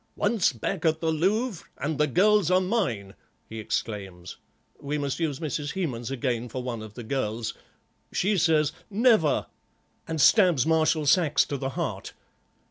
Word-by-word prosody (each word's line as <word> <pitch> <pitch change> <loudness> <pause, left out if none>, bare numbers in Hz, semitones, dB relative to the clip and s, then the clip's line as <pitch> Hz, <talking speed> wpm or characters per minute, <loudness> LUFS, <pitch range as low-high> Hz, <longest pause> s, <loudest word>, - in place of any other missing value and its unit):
'Once 205 -5 +2
back 150 - -4
at 160 -1 +2
the 160 -1 0
Louvre 195 +6 0
and 145 +2 -3
the 150 - +3
girls 200 - +3
are 185 0 +4
mine,' 175 - -1 0.3
he 110 - -7
exclaims. 95 -5 -5 0.4
We 145 +1 -3
must 140 0 -3
use 155 -5 -1
Mrs. 150 -2 -3
Hemans 130 -11 -3
again 125 -2 -2
for 125 +2 -5
one 120 -3 -4
of 110 -1 -10
the 120 - -7
girls; 115 -2 -2 0.6
she 200 +3 +1
says 160 -4 +3 0.2
'Never,' 215 - +3 0.6
and 160 -1 -3
stabs 175 - +5
Marshal 160 -1 +2
Saxe 150 -1 +3
to 145 - -4
the 135 -1 -3
heart." - - -4
150 Hz, 155 wpm, -26 LUFS, 125-180 Hz, 0.6 s, stabs